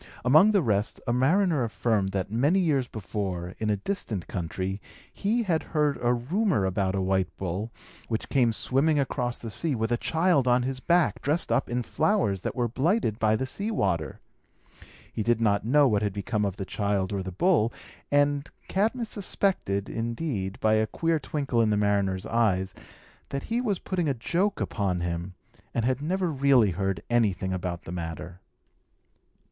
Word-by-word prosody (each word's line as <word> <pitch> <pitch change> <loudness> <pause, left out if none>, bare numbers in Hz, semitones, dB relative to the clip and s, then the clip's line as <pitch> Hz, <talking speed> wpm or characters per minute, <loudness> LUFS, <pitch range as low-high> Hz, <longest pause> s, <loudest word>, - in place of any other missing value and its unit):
Among 155 +11 +7
the 200 -5 +3
rest, 105 -4 0
a 120 - 0
mariner 155 +3 +3
affirmed, 110 -3 0
that, 95 0 -3
many 140 - +2
years 145 -8 +1
before, 95 -4 -4
in 110 - -1
a 105 - +2
distant 105 - -3
country, 95 +2 -4 0.3
he 225 +4 0
had 170 -6 +1 0.2
heard 150 -2 +2
a 120 - +2
rumour 140 - +1
about 95 0 0
a 95 - 0
white 95 -1 +1
bull, 95 +5 -3 0.4
which 110 -1 -2
came 125 -4 +3
swimming 140 +7 +1
across 125 -3 -1
the 115 - -7
sea 150 +7 +2
with 110 0 -1
a 120 - +2
child 160 -2 +2
on 125 0 +4
his 130 +1 -3
back, 170 +3 +2
dressed 150 +4 0
up - - +1
in 120 +1 -1
flowers 155 - +1
that - - -4
were 120 -2 +1
blighted 135 - 0
by 110 -1 +3
the 130 - -1
sea 200 +11 -3
water. 85 - -1 0.9
He - - -2
did 115 +1 +2
not 105 -1 +1
know 145 +3 +5
what 105 -4 +2
had 105 -2 -1
become 105 +1 -1
of 100 -1 -3
the 95 - -4
child 100 -1 -1
or 100 - -1
the 95 0 -5
bull; 115 - +2 0.4
and 145 0 +2 0.2
Cadmus 225 +4 0
suspected, 185 - -1
indeed, 115 -4 -3
by 110 0 +3
a 110 0 +2
queer 165 +6 0
twinkle 135 -4 -1
in 110 - +3
the 105 - +2
mariner's 100 -2 +1
eyes, 100 -5 +1 0.6
that 140 0 -3
he 240 - +2
was 210 -6 0
putting 175 -5 -2
a 135 - 0
joke 180 - 0
upon 95 -5 -1
him, 85 +1 -3 0.4
and 115 - +1
had 130 +1 0
never 180 +3 0
really 135 -7 +4
heard 95 -1 -2
anything 100 -6 +1
about 90 -1 -4
the - - -8
matter. 85 +1 -6
115 Hz, 180 wpm, -27 LUFS, 100-150 Hz, 0.9 s, Among